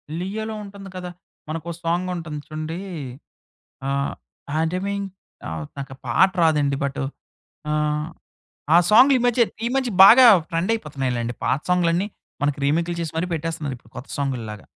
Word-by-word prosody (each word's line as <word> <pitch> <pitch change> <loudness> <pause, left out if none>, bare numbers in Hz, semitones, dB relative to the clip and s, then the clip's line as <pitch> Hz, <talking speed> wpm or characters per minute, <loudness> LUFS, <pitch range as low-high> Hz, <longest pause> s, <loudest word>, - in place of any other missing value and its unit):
'లియోలో' 215 +5 -4
ఉంటంది 200 -1 -10
కదా! 180 -1 -5 0.4
మనకో 165 +2 -4
సాంగుంటుంది 170 -2 -2
చూడండీ. 155 +2 -5 1.1
ఆహ్, 140 0 -1 0.4
హేండ 160 +2 0
మింగ్, 200 0 -2 0.4
ఆహ్, 80 -2 -5
నాకు 135 -1 -6
పాట 190 +11 +4
రాదండి. 145 -3 +2
బటు, 140 0 -2 0.7
ఆహ్, 150 0 0 0.7
ఆ - - +9
సాంగులీ 255 +4 +7
మధ్యే 240 -1 +4 0.2
ఈ - - +2
మధ్య 260 -2 0
బాగా 245 +5 +9 0.2
ట్రెండయిపోతున్నాయిలెండి. 140 - -1
పాత 140 - +1
సాంగ్‍లన్నీ, 180 +2 +2 0.3
మనకి 145 0 +1
రీమేకులు 170 +4 0
చేసి 165 -1 -4
మరీ 180 - -1
పెట్టేస్తున్నారు 160 -4 -3
ఇప్పుడు 110 0 -24
కొత్త 130 - -8
సాంగుల్లాగా. 115 -7 -3
165 Hz, 130 wpm, -23 LUFS, 140-190 Hz, 1.1 s, ఆ